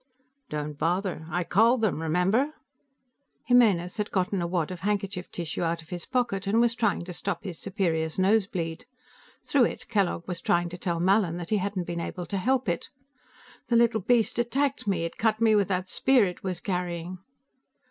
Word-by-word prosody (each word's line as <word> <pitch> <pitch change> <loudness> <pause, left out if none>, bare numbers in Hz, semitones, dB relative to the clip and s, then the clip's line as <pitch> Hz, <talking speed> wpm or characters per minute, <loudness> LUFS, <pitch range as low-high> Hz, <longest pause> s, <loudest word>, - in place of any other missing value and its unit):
"Don't 150 -1 -4
bother. 175 -1 -1
I 175 +2 -1
called 225 +7 +3
them. 205 -7 0
Remember?" 190 - +1 0.9
Jimenez 215 -7 +3
had 210 -1 -2
gotten 185 0 0
a 170 - -1
wad 170 -1 -1
of 180 - -6
handkerchief 195 -1 -2
tissue 170 -3 -4
out 165 -1 -1
of 160 - -22
his 175 -1 -6
pocket 240 -7 -1
and 215 +3 +3
was 235 -1 +3
trying 230 -6 0
to 180 +1 -7
stop 200 +3 -3
his 180 -5 -6
superior's 165 -6 -1
nosebleed. 190 -4 0 0.6
Through 270 -4 +4
it, - - -5
Kellogg 195 -6 0
was 180 -2 -4
trying 175 0 +1
to 175 - -7
tell 170 -2 -1
Mallin 185 -1 +2
that 175 +1 -6
he 215 - +3
hadn't 190 -2 -2
been 170 0 -3
able 175 +1 -5
to 200 - -3
help 255 +5 +1
it. 170 -1 -2 0.8
"The 235 - +1
little 230 -2 +4
beast 235 +2 +2
attacked 265 +1 0
me; 175 -4 +1
it 165 - -6
cut 220 -1 +2
me 225 -1 +4
with 205 -3 +3
that 185 -1 -1
spear 255 +2 +3
it 180 -2 -5
was 185 -3 -3
carrying." 180 -1 -3
190 Hz, 190 wpm, -27 LUFS, 175-220 Hz, 0.9 s, Through